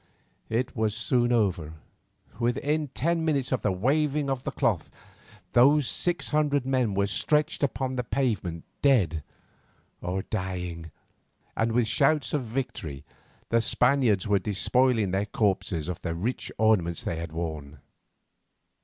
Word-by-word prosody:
It 120 +4 -1
was 110 -2 0
soon 120 +1 +1
over; 95 -9 +1 0.7
within 145 +6 0
ten 165 +5 -1
minutes 140 -5 0
of 130 - 0
the 105 - +1
waving 140 +7 +1
of 130 -2 -2
the - - 0
cloth, - - 0 0.6
those 140 +3 +5
six 175 -1 0
hundred 145 -3 +1
men 130 -6 +1
were 100 0 +2
stretched 150 +9 0
upon 130 -1 -1
the 125 - 0
pavement 110 -11 -1 0.2
dead 95 - +3 0.8
or 90 +2 -2
dying, 90 -5 -4 0.7
and 115 +1 +1
with 120 0 +3
shouts 130 +4 +2
of 145 -4 0
victory 110 - -4 0.5
the 115 0 +3
Spaniards 125 -5 +2
were 100 -1 +3
despoiling 110 +2 +1
their 100 +2 0
corpses 95 -6 0
of 90 -1 -5
the 85 -1 -3
rich 110 +10 -3
ornaments 95 -7 +2
they 80 - -2
had 85 -1 -5
worn. 80 -3 -5
115 Hz, 135 wpm, -27 LUFS, 95-135 Hz, 0.8 s, those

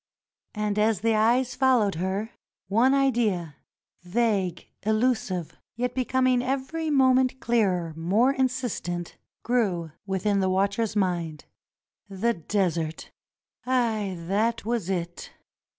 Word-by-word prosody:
And 210 0 -1
as 215 -2 +2
the 225 0 +2
eyes 240 +4 +2
followed 245 -6 +3
her, 190 +6 -2 0.4
one 245 +7 +4
idea 215 - +1 0.2
— - - -69 0.2
vague, 190 -2 0 0.2
elu 220 +4 +2
sive, 180 -7 -5 0.2
yet 245 +1 -2
becoming 255 0 +2
every 275 +5 -2
moment 260 -2 +3
clearer, 185 -10 +1
more 205 +11 +2
insistent 245 -10 -2
— - - -60
grew 195 -10 0 0.2
within 195 +1 0
the 190 -1 +1
watcher's 200 +4 0
mind. 175 -6 -1 0.6
The 210 +5 0
Desert! 170 -3 -2 0.6
Aye, 225 -6 0
that 210 +6 0
was 230 -5 -1
it. 175 -2 -4
215 Hz, 120 wpm, -26 LUFS, 185-245 Hz, 0.6 s, one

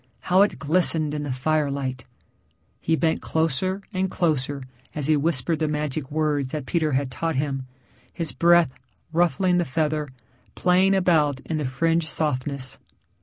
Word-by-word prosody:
How 185 +2 +3
it 205 - +2
glistened 155 -1 +2
in 150 - -3
the 145 -2 -3
firelight! 140 -2 -1 0.7
He 165 - +1
bent 160 0 0
closer 165 +5 -1
and 190 0 0
closer 145 -5 0 0.3
as 150 -2 0
he 155 +1 +4
whispered 155 0 +2
the 155 - +1
magic 150 -2 -3
words 150 -3 0
that 150 -1 -4
Peter 155 -1 0
had 130 0 0
taught 165 +4 -2
him, 135 -1 -2 0.4
his 165 -3 -2
breath 170 -4 +4 0.4
ruffling 175 +2 +2
the - - +2
feather, 150 0 -1 0.5
playing 185 +2 +3
about 155 -7 +2
in 160 - -3
the 150 - -2
fringed 165 +5 0
softness. 140 -3 -3
155 Hz, 150 wpm, -24 LUFS, 140-170 Hz, 0.7 s, he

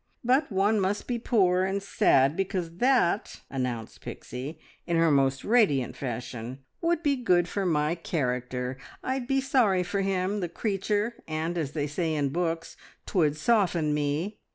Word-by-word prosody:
But 255 +3 +2
one 205 +3 +2
must 195 +2 -1
be 240 -1 -2
poor 185 -6 +3
and 195 +1 -1
sad, 135 -6 +3
because 180 -3 -2
that," 245 -6 +2
announced 125 -4 -4
Pixie, 130 +6 -7 0.3
in 170 -1 +1
her 165 -1 +4
most 135 -1 +2
radiant 145 - +3
fashion, 125 -1 -5 0.2
"would 340 0 +1
be 285 -2 +3
good 180 -9 +2
for 195 0 -1
my 150 -1 +1
character. 125 -6 -2 0.3
I'd 260 -1 -2
be 270 0 +2
sorry 230 -9 +3
for 195 +3 -1
him, 195 +1 0
the 175 -3 -2
creature! 210 +4 -1
And, 160 +2 -2
as 155 -4 -2
they 145 -2 -1
say 155 +2 -1
in 145 -2 +1
books, 165 +1 -2 0.3
'twould 155 -5 +1
soften 170 -5 +2
me. 150 +8 -1
175 Hz, 155 wpm, -27 LUFS, 145-205 Hz, 0.3 s, her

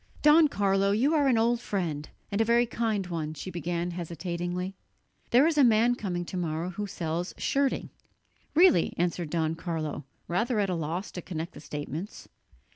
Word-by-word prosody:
"Don 305 +1 +7
Carlo, 195 -5 +2
you 265 +9 +2
are 290 -3 +3
an 250 -4 +4
old 235 +1 +2
friend, 165 -9 -3 0.2
and 200 +2 +1
a - - +6
very 235 +2 +3
kind 225 -4 -1
one," 160 -3 -4
she 185 +5 -6
began 175 0 -2
hesitatingly; 175 +2 -4 0.6
"there 250 +5 +6
is 320 -2 +2
a - - +7
man 235 0 +5
coming 180 -7 -3
to 185 - -5
morrow 170 +1 -2
who 205 +3 -4
sells 170 -1 -3
shirting." 275 -1 0 0.6
"Really?" 335 - +5
answered 175 -1 -1
Don 160 -1 0
Carlo, 160 -3 -4 0.2
rather 220 +6 0
at 195 -2 +1
a - - 0
loss 165 +4 -3
to 180 - -6
connect 165 0 -5
the - - -10
statements. 150 +6 -6
180 Hz, 175 wpm, -28 LUFS, 170-225 Hz, 0.6 s, Don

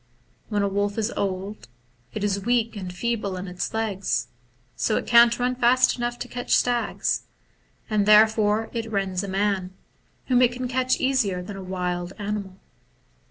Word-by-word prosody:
When 205 -2 0
a - - +2
wolf 205 +1 -1
is 225 +1 0
old, 195 - -3 0.4
it 215 - -5
is 200 -1 0
weak 235 0 +1
and 185 -3 -5
feeble 205 0 -2
in 185 +2 -6
its 180 0 -4
legs, 215 -4 -1 0.5
so 215 - 0
it - - -3
can't 235 0 +6
run 250 +1 0
fast 250 +1 +4
enough 240 0 -3
to 245 - -6
catch 245 0 0
stags, 245 -1 0 0.6
and 210 -2 +1
therefore 215 0 +4
it 225 -2 -4
rends 195 -2 -1
a - - -4
man, 190 -1 -1 0.5
whom 250 -1 +3
it 245 -1 +4
can 250 +1 -4
catch 255 +1 0
easier 220 -9 +1
than 205 +2 -8
a 195 - -7
wild 180 -1 -3
animal. 200 -2 -4
210 Hz, 165 wpm, -24 LUFS, 195-235 Hz, 0.6 s, can't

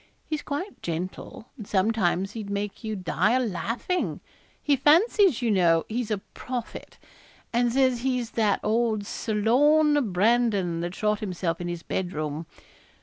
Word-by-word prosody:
He's 310 -1 -2
quite 305 +8 -5
gentle, 180 +6 -5
and 215 -5 -9
sometimes 195 -2 +1
he'd 215 -2 -6
make 200 +2 -4
you 220 -1 -3
die 190 +4 +1
o' 255 - 0
laughing. 230 - -2 0.4
He 290 - +2
fancies, 325 - +4
you 230 - +2
know, 170 -4 +3
he's 230 0 -2
a 215 - 0
prophet; 245 +4 -7 0.6
and 240 0 +2
says 255 -1 +2
he's 250 -3 -1
that 215 -3 +1
old 220 -1 +1
Sir 215 +1 -3
Lorne 290 +3 +3
Brandon 200 -3 +2
that 175 +2 -4
shot 210 -1 0
himself 180 -4 -3
in 175 - -3
his 175 -1 -5
bed 180 -1 -3
room. 155 +1 -4
220 Hz, 150 wpm, -26 LUFS, 185-250 Hz, 0.6 s, fancies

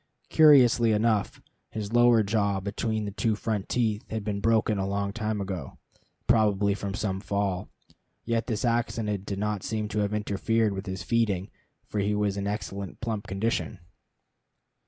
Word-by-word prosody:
Curiously 125 -7 +6
enough, 110 -1 0 0.3
his 110 0 -5
lower 120 -2 +5
jaw 100 -1 +1
between 110 +2 -2
the 100 - -4
two 110 +2 0
front 105 -2 -3
teeth 110 -3 0
had 110 -1 -3
been 100 -1 -2
broken 110 -1 +2
a 95 - -1
long 100 0 -2
time 110 -1 -2
ago, 95 -8 -5 0.5
probably 105 -3 +3
from 100 -1 -4
some 95 -3 -2
fall. 100 -2 -2 0.6
Yet 115 0 0
this 115 0 -1
accident 115 -4 -1
did 100 - -3
not 105 -1 -1
seem 110 +1 -2
to 105 0 -1
have 105 0 0
interfered 105 +1 0
with 95 +1 -6
his 95 -1 -4
feeding, 105 -2 0 0.3
for 105 - -3
he 100 +1 +1
was 105 -1 0
in 100 0 -3
excellent 100 -2 -5
plump 110 -3 -3
condition. 105 +1 -1
105 Hz, 160 wpm, -27 LUFS, 100-110 Hz, 0.6 s, Curiously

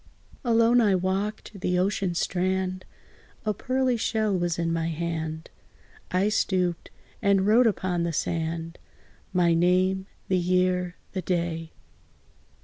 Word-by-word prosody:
Alone 235 0 +4
I 205 -4 +4
walked 195 +3 -2
the 180 0 +1
ocean 190 -1 0
strand; 185 +1 -1 0.6
A 215 - +1
pearly 255 +3 0
shell 215 -2 0
was 175 -2 0
in 165 -1 0
my 165 0 -1
hand: 160 -1 -4 0.6
I 185 +3 +2
stooped, 180 -5 0 0.3
and 200 -2 +3
wrote 230 +4 +5
upon 185 -4 0
the 170 0 0
sand 165 +1 -3 0.5
My 175 -2 +3
name 185 +3 +2 0.2
the 185 -1 +2
year 180 0 +1 0.2
the 190 - -3
day. 170 -2 -2
185 Hz, 125 wpm, -26 LUFS, 170-200 Hz, 0.6 s, wrote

